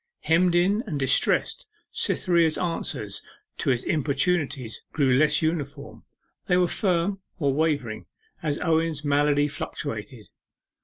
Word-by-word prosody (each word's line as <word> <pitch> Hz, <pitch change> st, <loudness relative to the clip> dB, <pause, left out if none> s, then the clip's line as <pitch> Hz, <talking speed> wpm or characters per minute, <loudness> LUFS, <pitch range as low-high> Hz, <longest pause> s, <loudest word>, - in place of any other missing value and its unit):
Hemmed 170 Hz, +2 st, +3 dB
in 195 Hz, +5 st, +3 dB
and 150 Hz, -7 st, -3 dB
distressed, 135 Hz, -2 st, +1 dB, 0.2 s
Cytherea's 170 Hz, -3 st, +2 dB
answers 170 Hz, -2 st, -2 dB, 0.4 s
to -, -, 0 dB
his 125 Hz, -2 st, +1 dB
importunities 145 Hz, -4 st, -1 dB
grew 135 Hz, -4 st, +2 dB
less 150 Hz, +2 st, +3 dB
uniform; 155 Hz, -3 st, -3 dB, 0.5 s
they 180 Hz, -, +3 dB
were 180 Hz, -1 st, +3 dB
firm, 190 Hz, 0 st, 0 dB, 0.2 s
or 140 Hz, -6 st, +1 dB
wavering, 140 Hz, -7 st, -1 dB, 0.3 s
as 150 Hz, -2 st, -1 dB
Owen's 160 Hz, -2 st, 0 dB
malady 145 Hz, 0 st, +2 dB
fluctuated. -, -, -6 dB
155 Hz, 115 wpm, -25 LUFS, 145-175 Hz, 0.5 s, Hemmed